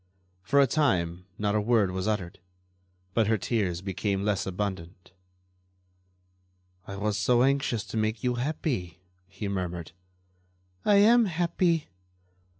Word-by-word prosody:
For 140 +10 +2
a 140 - +7
time 90 - 0
not 105 -1 0
a 105 - +2
word 105 -3 +2
was 95 +2 -3
uttered, 95 -5 -2 0.7
but 115 -3 +2
her 110 0 +2
tears 95 -5 -1
became 100 +1 -2
less 105 -3 0
abundant. 95 -2 -5 1.8
"I 100 - -6
was 105 +1 -1
so 120 +4 +3
anxious 135 -5 +1
to - - -6
make 110 0 -1
you 125 -1 +1
happy," 120 - -3 0.2
he 100 +2 -6
murmured. 90 -4 -4 0.9
"I 205 - +4
am 225 +4 +6
happy." 170 -2 0
105 Hz, 130 wpm, -27 LUFS, 95-130 Hz, 1.8 s, a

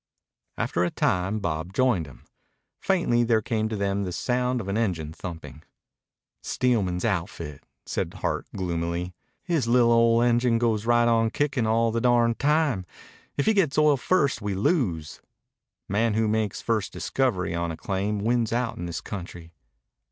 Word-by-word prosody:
After 90 - 0
a 90 - +1
time 95 +5 0
Bob 85 -1 -3
joined 110 - +2
him. 60 -3 -15 0.5
Faintly 170 -11 +2
there 115 -1 +3
came 110 -1 -1
to 110 - -3
them 100 0 -1
the 95 -2 -3
sound 125 +5 0
of 100 - -6
an 100 - -2
engine 90 -9 -1
thumping. 80 -5 -8 0.8
"Steelman's 100 -8 0
outfit," 85 -7 -3 0.2
said - - -3
Hart - - -2
gloomily. 85 -1 -2 0.3
"His 160 -9 0
li'l' 120 0 +4
old 115 0 +4
engine 120 0 +3
goes 115 -2 0
right 120 0 +4
on 115 -1 +3
kickin' 135 -3 0
all 115 +1 +2
the 115 +1 -1
darned 120 -1 +3
time. 150 -8 +2 0.5
If 140 - +1
he 220 - +4
gets 175 -9 +2
to 155 - +4
oil 150 -2 +4
first 140 -4 +1
we 100 -1 -2
lose. 95 - -1 0.7
Man 105 +2 +1
who 110 0 +2
makes 110 -2 -1
first 110 -4 0
discovery 110 -11 -1
on 85 0 -1
a 80 - -5
claim 100 +2 -2
wins 115 +2 0
out 120 0 -1
in 85 - -4
this 85 -1 -4
country." 90 -4 -8
110 Hz, 165 wpm, -25 LUFS, 90-120 Hz, 0.8 s, li'l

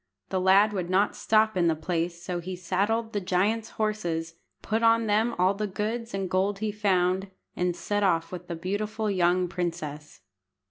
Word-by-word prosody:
The 185 - 0
lad 195 +3 +5
would 180 -3 -3
not 195 +3 +2
stop 220 -1 +2
in 175 -2 +2
the 165 - +2
place, 170 +1 -3
so 180 -2 -3
he 185 +2 -5
saddled 205 +6 -1
the 205 - -1
giant's 205 +5 0
horses, 175 -7 -2 0.3
put 220 +1 0
on 230 0 +4
them 220 +3 +1
all 185 +2 +3
the 210 +1 -3
goods 215 +3 -3
and 195 -1 -2
gold 195 +2 0
he 215 +1 -2
found, 190 -2 +1 0.3
and 180 -1 0
set 205 +2 -2
off 165 -5 +1
with 180 -1 -7
the 170 - -4
beautiful 210 +5 -2
young 180 -1 +2
princess. 160 - -5
190 Hz, 180 wpm, -27 LUFS, 175-215 Hz, 0.3 s, lad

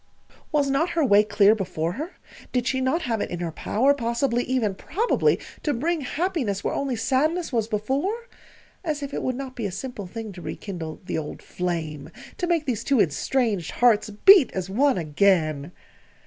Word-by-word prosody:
Was 290 -2 +2
not 275 +6 +1
her 320 - +4
way 205 -3 +6
clear 205 -1 +4
now - - +4
before 170 -4 -2
her? 305 - -6 0.4
Did 250 -2 0
she 260 0 0
not 305 +6 +1
have 225 -4 -1
it - - -2
in 175 - -4
her 170 -2 -3
power, 255 - +2
possibly 240 -1 0
even 245 -6 0
probably 390 - +1 0.2
to 295 - 0
bring 320 +6 0
happiness 275 - -2
where - - -1
only 275 -3 -1
sadness 290 +8 0
was 225 -2 +1
before? 275 - -2 0.6
As 305 -4 -2
if 280 0 -6
it - - -2
would 255 - -1
not 265 0 -6
be 225 -4 -2
a - - -6
simple 205 -1 -6
thing 220 +2 -6
to 180 -2 -10
rekindle 170 -4 -6
the - - -2
old 150 - -7
flame 160 -5 -4 0.3
to 355 - 0
make 335 -3 +1
these 240 -6 -2
two 275 -3 +2
estranged 205 - +1
hearts 230 -3 +3
beat 320 - +6
as 190 0 -4
one 270 +4 +3
again! 155 -2 +1
235 Hz, 190 wpm, -24 LUFS, 195-280 Hz, 0.6 s, way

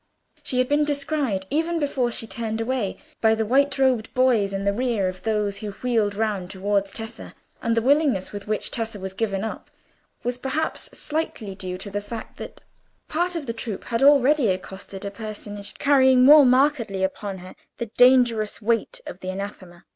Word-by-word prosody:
She 255 - 0
had 255 0 +3
been 290 +2 +2
descried, 280 -8 -1
even 330 +3 0
before 275 -5 0
she 230 - 0
turned 225 -1 -3
away, 225 -4 -2 0.2
by 220 0 +4
the 220 0 -1
white 280 +5 +2
robed 255 -5 +2
boys 245 -6 +3
in 195 0 -3
the 200 0 +1
rear 230 -4 0
of 185 0 -5
those 210 -2 -1
who 215 - -5
wheeled 220 -3 0
round 205 -4 -1
towards 200 0 -1
Tessa, 225 +2 -6 0.3
and 230 -1 0
the 230 - +2
willingness 275 -7 +2
with 205 0 -8
which 215 -1 -2
Tessa 225 -2 -3
was 190 0 -5
given 195 -1 -2
up 220 - -6 0.5
was, 245 +1 -2
perhaps, 310 - -2
slightly 295 -10 -3
due 185 -1 -6
to 200 +2 -6
the 205 +1 -2
fact 220 +2 -8
that - - -9 0.5
part 350 +3 0
of 325 -4 -3
the 230 - -3
troop 225 -3 -4
had 230 +1 -2
already 280 -1 +5
accosted 190 +1 -4
a 200 - -4
personage 205 -1 -7
carrying 260 -3 +5
more 290 -1 +9
markedly 250 -7 +2
upon 190 +1 -3
her 185 0 -11 0.2
the 235 -3 -5
dangerous 245 -4 +4
weight 235 - -1
of - - -8
the 185 - -6
Anathema. 185 -2 -7
225 Hz, 185 wpm, -24 LUFS, 200-260 Hz, 0.5 s, more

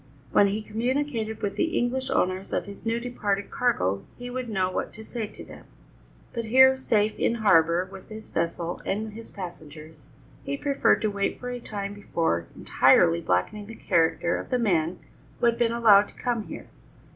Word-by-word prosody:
When 200 - +5
he 210 +2 -2
communicated 230 0 -2
with 200 -1 -2
the 335 -1 0
English 260 +2 -1
owners 185 +1 0
of - - 0
his 200 0 -11
now 230 +1 0
departed 210 -5 -2
cargo, 100 - 0
he 245 0 -7
would 250 -1 -4
know 190 -3 0
what - - -3
to 220 - -9
say 225 -2 -4
to - - -11
them, - - -13 0.7
but 230 -2 -3
here, 265 +3 +6
safe 220 -5 0
in 235 - +2
harbour 170 -5 +4
with 190 -1 -11
his 215 0 -9
vessel 170 +1 -3
and 215 +2 -3
his 230 +1 -9
passengers, 155 -5 -10 0.4
he 140 - -3
preferred 280 - +2
to 215 - +1
wait 200 0 -2
for 250 0 -5
a 245 - -4
time 200 -3 -5
before 165 - -1
entirely 85 0 +4
blackening 200 - -1
the 225 - -9
character 175 -3 +1
of - - -7
the 250 - +1
man 175 -7 +1 0.4
who - - +1
had 235 0 +2
allowed 230 -3 +5
him - - -18
to - - -14
come 240 -3 0
here. - - -8
210 Hz, 185 wpm, -26 LUFS, 180-235 Hz, 0.7 s, here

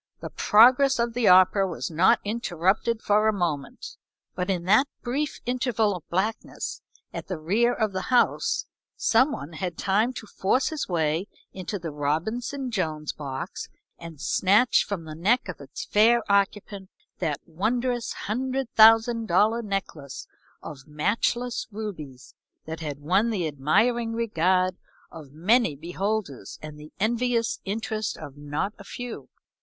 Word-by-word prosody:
The - - -7
progress 255 +5 +5
of 235 0 0
the 240 -2 +1
opera 185 +2 +6
was 175 -1 -5
not 170 +4 +4
interrupted 210 +1 0
for 210 +1 +3
a - - +5
moment, 165 -9 -4 0.4
but 180 +1 -3
in 180 -3 -1
that 215 +10 +4 0.2
brief 280 +5 -2
interval 235 -5 0
of 175 - -11
blackness 205 +6 -3 0.3
at - - -6
the 185 - -4
rear 205 +10 +2
of 220 -3 -1
the 190 0 -3
house 470 - +2 0.3
some 255 +6 +3
one 155 - -6
had 175 +2 -3
had - - -33
time 210 +5 +1
to 225 - -8
force 210 +5 0
his 315 -2 -4
way 165 +1 0 0.3
into 190 +2 -5
the 170 -4 -6
Robinson 220 - -2
Jones 155 -8 -2
box 140 +4 -6 0.3
and 165 -3 -10
snatch 205 - +3
from 200 -5 -4
the 155 - -7
neck 205 +11 +1
of 185 - -7
its 140 +1 -8
fair 230 +3 +4
occupant 200 -1 0 0.3
that 150 -5 -1
wondrous 235 +8 -1
hundred 260 +3 -2
thousand 225 +1 +6
dollar 225 +3 +3
necklace 195 - -5 0.4
of 135 -3 -10
matchless 230 +10 -1
rubies 170 - -8 0.3
that 160 +1 -6
had 150 -3 -5
won 190 +9 +2
the 190 -7 -1
admiring 220 - +1
regard 185 -4 +1 0.3
of 150 -4 -11
many 180 - +2
beholders, 175 - -4
and 150 -1 -10
the 150 +1 -12
envious 230 +2 0
interest 215 0 -3
of 140 - -9
not 145 +7 -3
a - - -10
few. 230 - -8
200 Hz, 150 wpm, -25 LUFS, 165-230 Hz, 0.4 s, opera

